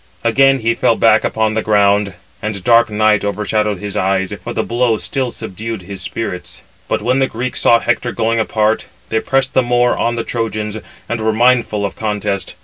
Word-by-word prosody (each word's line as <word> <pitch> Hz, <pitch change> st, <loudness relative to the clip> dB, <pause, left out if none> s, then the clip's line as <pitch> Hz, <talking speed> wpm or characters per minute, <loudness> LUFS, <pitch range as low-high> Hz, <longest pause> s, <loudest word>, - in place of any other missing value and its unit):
Again 135 Hz, +3 st, +3 dB
he 115 Hz, +1 st, +2 dB
fell -, -, +2 dB
back -, -, +4 dB
upon 110 Hz, -1 st, 0 dB
the 110 Hz, -, 0 dB
ground, 100 Hz, -2 st, +2 dB, 0.3 s
and 105 Hz, -3 st, -4 dB
dark 115 Hz, -1 st, +4 dB
night 105 Hz, 0 st, +2 dB
overshadowed 105 Hz, +1 st, -1 dB
his 105 Hz, +2 st, -6 dB
eyes; 95 Hz, +1 st, 0 dB
for 120 Hz, -, -5 dB
the -, -, -1 dB
blow 120 Hz, -1 st, +1 dB
still 130 Hz, +3 st, -2 dB
subdued 110 Hz, -2 st, -6 dB
his 95 Hz, +1 st, -7 dB
spirits. 90 Hz, -2 st, -5 dB, 0.2 s
But -, -, -1 dB
when 130 Hz, +2 st, +1 dB
the 135 Hz, -, +2 dB
Greeks 125 Hz, +2 st, -3 dB
saw 115 Hz, -, +5 dB
Hector 120 Hz, +1 st, -1 dB
going 115 Hz, 0 st, 0 dB
apart, 110 Hz, 0 st, 0 dB, 0.2 s
they 110 Hz, -, +1 dB
pressed 135 Hz, +2 st, 0 dB
the 130 Hz, -, +4 dB
more 120 Hz, 0 st, +2 dB
on 120 Hz, 0 st, 0 dB
the 115 Hz, -, -2 dB
Trojans, 110 Hz, -2 st, -3 dB, 0.3 s
and 120 Hz, 0 st, -3 dB
were 110 Hz, 0 st, +1 dB
mindful 115 Hz, -2 st, +2 dB
of 100 Hz, -, -4 dB
contest. 105 Hz, -3 st, -3 dB
110 Hz, 190 wpm, -16 LUFS, 105-120 Hz, 0.3 s, saw